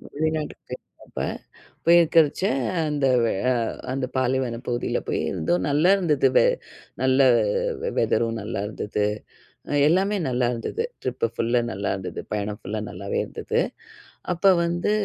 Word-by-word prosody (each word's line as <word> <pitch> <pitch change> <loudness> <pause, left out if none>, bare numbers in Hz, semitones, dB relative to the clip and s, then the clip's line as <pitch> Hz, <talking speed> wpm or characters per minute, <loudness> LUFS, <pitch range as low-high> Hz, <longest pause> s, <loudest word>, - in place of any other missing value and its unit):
வெளிநாட்டுக்கு 155 0 -2
போயிருந்தப்ப, - - -9 0.7
போயிருக்கறச்ச 165 -1 +5 0.4
அந்த 145 -2 0 0.4
ஆ - - +4 0.4
அந்த 130 -1 -1
பாலைவனப் 130 -1 0
பகுதியில 120 0 -1
போய் - - 0
இருந்தோம், 90 +3 0
நல்லா 155 +6 +4
இருந்தது, 150 -8 +2
வெ - - +5 0.6
நல்ல 130 +1 +3 0.8
வெதரும் 115 -1 +1
நல்லாயிருந்துது. 105 0 -2 0.8
எல்லாமே 195 +5 +2
நல்லா 125 0 +1
இருந்தது. 420 - -3 0.2
ட்ரிப்பு 125 -1 -1
ஃபுல்லா 120 +1 +1
நல்லாயிருந்தது. 95 -1 -3
பயணம் 105 0 -2
ஃபுல்லா 105 +3 -4
நல்லாவே 100 +3 -4
இருந்தது. - - -2 0.7
அப்போ 180 +3 +3 0.2
வந்து 175 +4 0
130 Hz, 110 wpm, -24 LUFS, 110-160 Hz, 0.8 s, போயிருக்கறச்ச